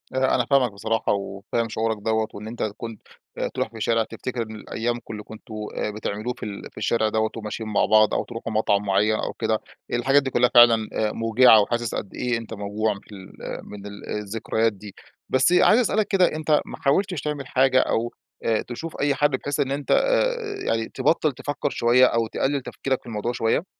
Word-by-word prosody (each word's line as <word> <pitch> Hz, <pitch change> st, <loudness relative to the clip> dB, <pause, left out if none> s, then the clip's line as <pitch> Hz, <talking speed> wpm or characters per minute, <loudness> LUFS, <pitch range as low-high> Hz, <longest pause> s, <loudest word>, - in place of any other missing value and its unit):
أنا 130 Hz, 0 st, +2 dB
أنا 125 Hz, -, +1 dB
فاهمك 130 Hz, -3 st, +3 dB
بصراحة، 110 Hz, +3 st, -1 dB
وفاهم 100 Hz, +3 st, -3 dB
شعورك 110 Hz, 0 st, -1 dB
دوّة 110 Hz, 0 st, 0 dB
وإن 105 Hz, +1 st, -8 dB
أنت 120 Hz, +2 st, -4 dB
كنت 115 Hz, -2 st, -7 dB, 0.4 s
آآ، -, -, -1 dB
تروح -, -, -2 dB
في 115 Hz, -, -12 dB
الشارع 115 Hz, +1 st, +1 dB
تفتكر 120 Hz, +2 st, -5 dB
إن 110 Hz, -1 st, -6 dB
ال 105 Hz, -, -12 dB
أيامكم 120 Hz, 0 st, -3 dB
اللي 105 Hz, -1 st, -7 dB
كنتم 110 Hz, +1 st, -12 dB, 0.4 s
بتعملوه 110 Hz, +3 st, -3 dB
في -, -, -10 dB
ال 100 Hz, -2 st, -7 dB
في -, -, -30 dB
الشارع 110 Hz, -2 st, +1 dB
دوّة، 110 Hz, 0 st, +1 dB
وماشيين 110 Hz, 0 st, -5 dB
مع 105 Hz, -, +2 dB
بعض 110 Hz, 0 st, +4 dB
أو -, -, +1 dB
تروحوا 115 Hz, 0 st, -6 dB
مطعم 105 Hz, -2 st, +2 dB
معيّن 105 Hz, +2 st, +2 dB
أو -, -, -3 dB
كده، -, -, 0 dB, 0.3 s
الحاجات 135 Hz, +4 st, +3 dB
دي 135 Hz, -, -2 dB
كلها 125 Hz, -1 st, +3 dB
فعلًا 115 Hz, -2 st, +7 dB
آآ، 110 Hz, -1 st, 0 dB
موجعة 115 Hz, 0 st, +5 dB
وحاسس 120 Hz, +2 st, -1 dB
قد 95 Hz, -, -5 dB
إيه 125 Hz, -1 st, 0 dB
أنت 115 Hz, -1 st, -8 dB
موجوع 105 Hz, +1 st, -1 dB
من 100 Hz, -, -10 dB
ال 95 Hz, -2 st, -10 dB, 0.4 s
من 105 Hz, -1 st, -9 dB
ال 100 Hz, 0 st, -9 dB
الذكريات 110 Hz, +2 st, -1 dB
دي، 100 Hz, 0 st, -12 dB, 0.3 s
بس 130 Hz, +5 st, +3 dB
عايز 215 Hz, +5 st, +6 dB
أسألك 215 Hz, -3 st, +1 dB
كده 190 Hz, -3 st, +4 dB
أنت 155 Hz, -1 st, +2 dB
ما -, -, -8 dB
حاولتش 180 Hz, +3 st, +1 dB
تعمل 145 Hz, -2 st, -4 dB
حاجة، 130 Hz, 0 st, +3 dB
أو 120 Hz, -2 st, 0 dB, 0.3 s
آآ 110 Hz, -1 st, +1 dB
تشوف 160 Hz, +7 st, -7 dB
أي 140 Hz, -1 st, +2 dB
حد 145 Hz, +1 st, +3 dB
بحيث 145 Hz, +2 st, -3 dB
إن 135 Hz, -, +1 dB
أنت 140 Hz, +1 st, -3 dB
آآ -, -, +3 dB, 0.3 s
يعني 115 Hz, 0 st, 0 dB
تبطّل 155 Hz, -2 st, +1 dB
تفكّر 145 Hz, +2 st, -3 dB
شوية، 125 Hz, 0 st, +4 dB
أو 115 Hz, -2 st, +1 dB
تقلّل 140 Hz, +5 st, -1 dB
تفكيرك 130 Hz, +1 st, -3 dB
في -, -, -28 dB
الموضوع 115 Hz, 0 st, -3 dB
شوية؟ 115 Hz, +7 st, 0 dB
115 Hz, 200 wpm, -24 LUFS, 110-130 Hz, 0.4 s, فعلًا